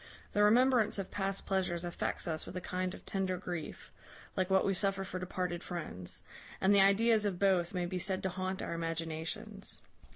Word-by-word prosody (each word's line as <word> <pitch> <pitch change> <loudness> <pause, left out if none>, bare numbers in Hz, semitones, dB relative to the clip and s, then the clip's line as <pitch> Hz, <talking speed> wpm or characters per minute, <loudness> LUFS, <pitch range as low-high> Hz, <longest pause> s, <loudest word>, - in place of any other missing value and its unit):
The 205 - +3
remembrance 235 +1 +5
of 195 -2 -4
past 195 -1 -1
pleasures 180 -3 0
affects 175 0 -2
us 160 -1 -2
with - - -6
a - - 0
kind 185 +1 -2
of - - -14
tender 190 -2 -1
grief, 175 -3 -6 0.4
like 185 0 0
what 190 0 +4
we 195 - +2
suffer 195 0 0
for 185 -1 -5
departed 180 -1 -2
friends; 125 - -5 0.4
and 195 +1 +4
the 200 - +7
ideas 215 +3 +5
of 200 -4 0
both 185 -2 +2
may 180 -1 0
be 180 +1 -3
said 190 +1 0
to 190 - +1
haunt 185 +1 -3
our - - -3
imaginations. 165 +5 -4
185 Hz, 190 wpm, -33 LUFS, 175-195 Hz, 0.4 s, the